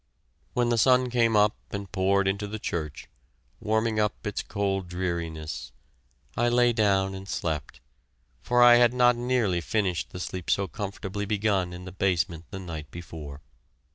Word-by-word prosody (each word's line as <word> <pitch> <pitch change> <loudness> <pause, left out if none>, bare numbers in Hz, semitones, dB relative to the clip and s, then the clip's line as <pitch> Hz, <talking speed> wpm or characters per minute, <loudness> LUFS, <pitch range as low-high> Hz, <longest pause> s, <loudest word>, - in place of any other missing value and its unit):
When 120 -1 +1
the 120 -1 +2
sun 125 +1 +4
came 115 -2 +3
up 105 0 +4
and 100 -2 -6
poured 95 +1 +2
into 100 +2 -1
the 110 +2 -5
church, 80 -8 -4 0.5
warming 110 0 0
up 105 +1 -1
its 105 - -2
cold 100 -3 -2
dreariness, 85 -6 -4 0.6
I 120 +1 +2
lay 120 0 +4
down 100 -3 +2
and 95 +1 -8
slept, 75 -10 -3 0.6
for 120 0 +3
I 120 0 +9
had 120 0 +4
not 125 -1 +5
nearly 120 -7 0
finished 90 -2 -1
the 90 - -8
sleep 90 -1 -5
so 100 0 +2
comfortably 100 +3 -5
begun 100 -3 +1
in 90 +1 -8
the 95 - -7
basement 90 -3 0
the - - -6
night 80 -5 -7
before. 75 -4 -9
100 Hz, 160 wpm, -27 LUFS, 90-110 Hz, 0.6 s, I